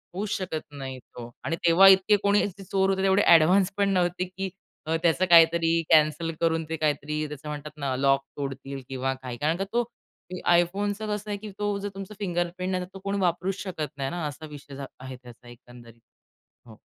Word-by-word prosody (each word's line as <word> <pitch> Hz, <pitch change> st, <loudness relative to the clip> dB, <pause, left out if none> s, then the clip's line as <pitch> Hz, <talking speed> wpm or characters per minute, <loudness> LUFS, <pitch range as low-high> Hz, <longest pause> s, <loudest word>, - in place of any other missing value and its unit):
होऊच 205 Hz, +2 st, -3 dB
शकत 175 Hz, -5 st, -4 dB
नाही 135 Hz, -2 st, -7 dB
तो 120 Hz, -1 st, -11 dB
आणि 165 Hz, -, -1 dB
तेव्हा 170 Hz, +3 st, +7 dB
इतके 190 Hz, +2 st, +5 dB
कोणी 205 Hz, 0 st, +3 dB
च 195 Hz, +1 st, -14 dB
चोर 195 Hz, 0 st, +2 dB
होते 190 Hz, 0 st, 0 dB
एवढे 190 Hz, +1 st, +4 dB
ॲडव्हान्स 180 Hz, +3 st, +5 dB
पण 200 Hz, -1 st, +2 dB
नव्हते 180 Hz, -1 st, +1 dB
की 190 Hz, +1 st, -5 dB, 0.4 s
अ, 160 Hz, -, +1 dB
त्याचं 170 Hz, +2 st, +3 dB
काहीतरी 165 Hz, 0 st, +5 dB
कॅन्सल 155 Hz, +1 st, +3 dB
करून 165 Hz, -1 st, +1 dB
ते 160 Hz, -, -2 dB
काहीतरी 150 Hz, 0 st, -1 dB
त्याचं 150 Hz, +1 st, -9 dB
म्हणतात 150 Hz, 0 st, -6 dB
ना 140 Hz, -3 st, -2 dB
लॉक 135 Hz, +1 st, +3 dB, 0.2 s
तोडतील 135 Hz, -1 st, -5 dB
किंवा 130 Hz, 0 st, -2 dB
काही, 130 Hz, -2 st, -8 dB
कारण 155 Hz, +6 st, 0 dB
का 195 Hz, -, -1 dB
तो 240 Hz, +1 st, +2 dB, 0.5 s
ते 185 Hz, -, -5 dB
iPhoneचं 200 Hz, +5 st, +1 dB
कसं 210 Hz, 0 st, -5 dB
आहे 205 Hz, -, -2 dB
की 210 Hz, +1 st, -9 dB
तो 205 Hz, -1 st, -1 dB
जर 205 Hz, +1 st, -4 dB
तुमचं 195 Hz, +1 st, -7 dB
फिंगरप्रिंट 180 Hz, -1 st, -2 dB
नाही 185 Hz, -1 st, -1 dB
तर -, -, -9 dB
तो 195 Hz, -, -9 dB
कोणी 200 Hz, 0 st, -1 dB
वापरूच 185 Hz, +1 st, 0 dB
शकत 180 Hz, -6 st, -4 dB
नाही 135 Hz, -1 st, -2 dB
ना, 175 Hz, 0 st, -4 dB
असा 150 Hz, +2 st, -8 dB
विषय 145 Hz, -2 st, -11 dB
झा 140 Hz, 0 st, -6 dB
आहे 130 Hz, 0 st, -8 dB
त्याचा 120 Hz, 0 st, -14 dB
एकंदरीत. 120 Hz, -1 st, -15 dB, 0.7 s
हो. 110 Hz, -1 st, -14 dB
165 Hz, 200 wpm, -26 LUFS, 145-190 Hz, 0.7 s, तेव्हा